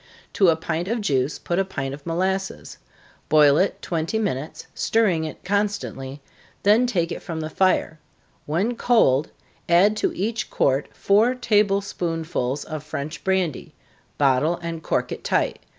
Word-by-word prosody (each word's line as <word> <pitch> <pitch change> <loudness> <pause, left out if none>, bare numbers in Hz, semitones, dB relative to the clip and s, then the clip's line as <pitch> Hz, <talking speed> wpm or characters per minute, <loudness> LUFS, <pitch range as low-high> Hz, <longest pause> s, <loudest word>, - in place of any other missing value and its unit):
To 195 - +4
a 165 - +4
pint 165 +2 -3
of 230 +3 -1
juice, 140 -8 0
put 175 +1 -2
a - - +3
pint 135 -8 -4
of 140 +3 -10
molasses. 190 +3 -2 0.5
Boil 150 -1 +6
it 190 - 0
twenty 165 +5 -2
minutes, 160 -9 -3
stirring 190 -8 +1
it 155 - -8
constantly, 190 -9 -2 0.4
then 220 +5 +5
take 175 -7 0
it - - -5
from 165 -3 -5
the 155 0 -5
fire 185 -4 +1 0.5
when 195 +11 0
cold, 165 - +3 0.4
add 190 +5 +5
to - - 0
each 220 +3 -2
quart 135 +1 +1
four 220 +6 +3
table 210 -5 +2
spoonsful 165 -8 -3
of 155 -2 -6
French 150 0 -6
brandy 190 -6 -1 0.4
bottle 145 +4 +2
and 165 -1 -4
cork - - -1
it - - -6
tight. - - 0
170 Hz, 150 wpm, -23 LUFS, 150-200 Hz, 0.5 s, Boil